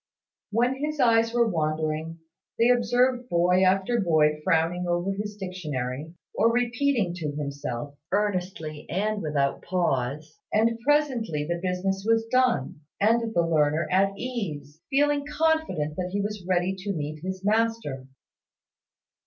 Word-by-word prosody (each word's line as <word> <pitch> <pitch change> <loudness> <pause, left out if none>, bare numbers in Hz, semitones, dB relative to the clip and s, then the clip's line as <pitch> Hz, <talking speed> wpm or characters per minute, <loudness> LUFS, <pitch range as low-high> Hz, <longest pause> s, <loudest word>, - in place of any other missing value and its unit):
When 240 +5 +1
his 300 +2 -3
eyes 230 -2 +4
were 235 0 +3
wandering, 155 -2 -2 0.4
they 230 +1 +4
observed 245 +1 +2
boy 175 +2 +3
after 195 +5 +2
boy 155 -5 +2
frowning 175 +1 +1
over 175 +2 0
his 205 +1 -5
dictionary, 155 -6 -4 0.2
or 230 - +3
repeating 245 -4 +1
to 150 -4 -3
himself, 140 -2 -4 0.2
earnestly 180 -7 -2
and 205 +5 -1
without 145 -4 0
pause; 150 -4 -2
and 230 +2 +2
presently 245 - +1
the 170 +2 -2
business 190 +1 -1
was 225 +1 +2
done, 245 - +1 0.2
and 225 +2 +2
the 170 - +4
learner 155 0 +2
at 195 +1 +2
ease, 160 - -5
feeling 290 +1 +2
confident 295 - 0
that 180 -1 -2
he 200 - 0
was 205 -2 -4
ready 180 +1 +2
to 200 +2 -3
meet 155 -2 -5
his 190 +2 -5
master. 215 -12 0
185 Hz, 135 wpm, -26 LUFS, 155-230 Hz, 0.4 s, eyes